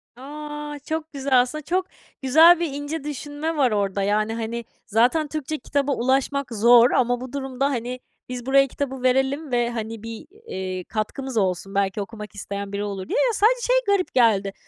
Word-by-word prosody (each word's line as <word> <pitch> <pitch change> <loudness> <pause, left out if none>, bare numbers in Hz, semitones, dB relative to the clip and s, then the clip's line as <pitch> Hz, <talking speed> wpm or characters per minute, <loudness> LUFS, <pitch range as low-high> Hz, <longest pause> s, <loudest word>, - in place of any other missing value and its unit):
A! 295 +2 -7
Çok 320 0 -3
güzel. 265 -2 +3
Aslında 305 +5 -3
çok 365 +4 0 0.4
güzel 320 +6 +7
ve 340 - 0
ince 290 +2 -5
düşünme 295 +2 -4
var 260 -5 +3
orada. 200 -1 0
Yani, 215 +2 +1
hani, 230 0 -4 0.2
zaten 245 +8 +2
Türkçe 310 0 -4
kitaba 285 +2 -1
ulaşmak 265 +1 0
zor 235 +3 +6
ama 245 -1 +1
bu 255 +1 -8
durumda, 270 -1 -2
hani, 250 -1 -3 0.3
"Biz 250 -1 -5
buraya 275 +1 +4
kitabı 265 -1 -4
verelim 265 +3 +1
ve, 240 -1 +1
hani, 225 -1 -5
bir, 230 +7 -8 0.2
eee, 185 -1 -4
katkımız 230 +5 -4
olsun, 195 0 -1
belki 200 +1 0
okumak 210 0 -8
isteyen 200 0 -6
biri 200 +1 -2
olur," 195 -2 -5
diye. - - 0
Ya, 465 - 0
sadece 470 +5 +3
şey - - +4
garip 395 -5 +1
geldi. 205 -5 +3
255 Hz, 175 wpm, -23 LUFS, 220-290 Hz, 0.4 s, güzel